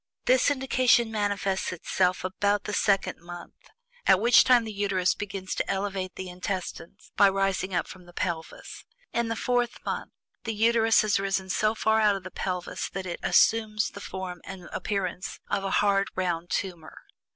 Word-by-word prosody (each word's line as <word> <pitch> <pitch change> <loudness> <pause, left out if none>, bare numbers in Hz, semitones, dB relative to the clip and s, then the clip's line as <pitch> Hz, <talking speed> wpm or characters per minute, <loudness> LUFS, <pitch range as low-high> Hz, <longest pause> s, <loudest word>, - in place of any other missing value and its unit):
This 255 +1 +4
indication 255 -4 +2
manifests 205 -2 -1
itself 180 +1 0
about 200 +2 0
the 210 - -5
second 200 -1 +1
month, 175 +1 -12 0.4
at 185 - +6
which 235 +2 +6
time 250 -2 +5
the 220 -1 -6
Uterus 195 -2 +1
begins 195 -2 -5
to - - -2
elevate 195 -1 -2
the 190 - -6
intestines 180 +1 -6
by 200 -1 +6
rising 195 -1 -1
up - - +1
from 180 -2 -12
the - - -13
pelvis. 170 -2 -5 0.3
In 235 -1 0
the 230 - -2
fourth 245 0 0
month - - -3 0.3
the 225 -2 -3
Uterus 225 +1 +4
has 210 -2 +2
risen 195 -1 -1
so 215 +3 +1
far 220 0 +2
out 210 -2 +4
of 195 - -6
the 185 - -8
pelvis 180 -1 -3
that 190 0 -5
it 175 -2 -5
assumes 215 -1 +3
the 200 - -10
form 185 -3 -6
and 185 -3 -9
appearance 190 -3 -3
of 195 - 0
a 195 - -1
hard 200 -1 +2
round 175 -2 -2
tumor. 175 -5 -4
195 Hz, 175 wpm, -27 LUFS, 185-215 Hz, 0.4 s, at